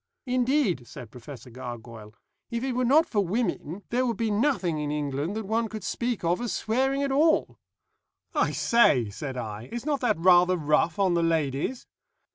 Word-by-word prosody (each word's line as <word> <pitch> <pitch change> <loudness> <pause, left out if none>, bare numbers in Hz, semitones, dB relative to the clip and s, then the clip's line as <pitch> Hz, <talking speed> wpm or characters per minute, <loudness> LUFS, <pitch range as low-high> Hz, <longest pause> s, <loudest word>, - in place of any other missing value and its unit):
Indeed," 250 - +1
said 125 -3 -10
Professor 125 0 -11
Gargoyle, 115 -3 -9 0.3
"if 235 0 -3
it 265 - -1
were 250 +1 0
not 290 +7 +5
for 205 -3 0
women 195 -2 -2
there 250 +2 +2
would 235 -3 -1
be 225 -2 0
nothing 205 - +1
in 150 -1 -2
England 145 +4 -2
that 220 -1 -4
one 225 +3 0
could 215 -2 -7
speak 235 +3 -2
of 175 +5 +1
as 240 - -2
swearing 265 +5 0
at 275 - -1
all." 310 +4 +2 0.7
"I - - +2
say," 130 - +3
said 130 +4 -6
I, 110 -1 -6
"is 240 +2 -5
not 295 -2 0
that 230 -7 +1
rather 180 +1 +5
rough 155 +1 +1
on 195 -3 +2
the 170 - +2
ladies?" 160 - -1
185 Hz, 180 wpm, -26 LUFS, 145-240 Hz, 0.7 s, not